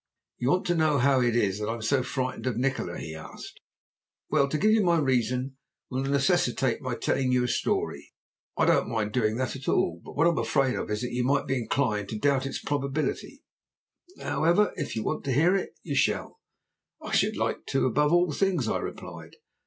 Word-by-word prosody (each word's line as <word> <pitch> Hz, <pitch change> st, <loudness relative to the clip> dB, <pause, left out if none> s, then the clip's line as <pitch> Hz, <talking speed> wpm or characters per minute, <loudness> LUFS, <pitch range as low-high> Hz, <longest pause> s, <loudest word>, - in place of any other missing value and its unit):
"You 125 Hz, -, 0 dB
want 180 Hz, +5 st, +2 dB
to 175 Hz, -, +2 dB
know 155 Hz, -3 st, +2 dB
how 135 Hz, 0 st, +3 dB
it 120 Hz, -1 st, +2 dB
is 100 Hz, -4 st, +1 dB
that 105 Hz, -, -3 dB
I 115 Hz, -, -1 dB
am 115 Hz, -, -8 dB
so 130 Hz, +4 st, +2 dB
frightened 130 Hz, 0 st, -3 dB
of 120 Hz, -3 st, -1 dB
Nikola?" 130 Hz, -9 st, -1 dB
he 80 Hz, -, -6 dB
asked. 80 Hz, 0 st, -10 dB, 0.7 s
"Well, 140 Hz, -3 st, +3 dB
to 155 Hz, -, 0 dB
give 215 Hz, +6 st, +3 dB
you 220 Hz, -1 st, +4 dB
my 170 Hz, -2 st, +3 dB
reason 130 Hz, -1 st, 0 dB, 0.3 s
will 130 Hz, +1 st, -1 dB
necessitate 135 Hz, -3 st, +1 dB
my 130 Hz, -2 st, -3 dB
telling 130 Hz, +2 st, 0 dB
you 125 Hz, -1 st, +3 dB
a -, -, 0 dB
story. -, -, -2 dB, 0.5 s
I -, -, +3 dB
don't -, -, +3 dB
mind 110 Hz, -2 st, -1 dB
doing 110 Hz, -2 st, +1 dB
that 130 Hz, +1 st, -2 dB
at 135 Hz, -, -9 dB
all, 85 Hz, 0 st, +1 dB
but -, -, -10 dB
what 155 Hz, -, +2 dB
I 170 Hz, -, +5 dB
am 160 Hz, -, -1 dB
afraid 125 Hz, +3 st, +1 dB
of -, -, -4 dB
is 105 Hz, +1 st, -2 dB
that 125 Hz, 0 st, -3 dB
you 125 Hz, 0 st, 0 dB
may 140 Hz, +2 st, +1 dB
be 135 Hz, -1 st, -1 dB
inclined 110 Hz, -4 st, -1 dB
to 110 Hz, -, -4 dB
doubt 135 Hz, +3 st, +1 dB
its -, -, -4 dB
probability. 145 Hz, +1 st, -3 dB, 0.8 s
However, 175 Hz, +6 st, +2 dB
if 150 Hz, -5 st, -4 dB
you 110 Hz, -, -2 dB
want -, -, -2 dB
to 135 Hz, -, 0 dB
hear 165 Hz, +8 st, +4 dB
it 195 Hz, -, -3 dB
you 150 Hz, -, -4 dB
shall." 140 Hz, -, 0 dB, 0.6 s
"I -, -, -8 dB
should -, -, +2 dB
like -, -, -2 dB
to 135 Hz, -, +1 dB
above 150 Hz, +4 st, +2 dB
all 175 Hz, -1 st, +3 dB
things," 175 Hz, -, 0 dB
I -, -, 0 dB
replied. -, -, -8 dB
130 Hz, 215 wpm, -27 LUFS, 120-145 Hz, 0.8 s, I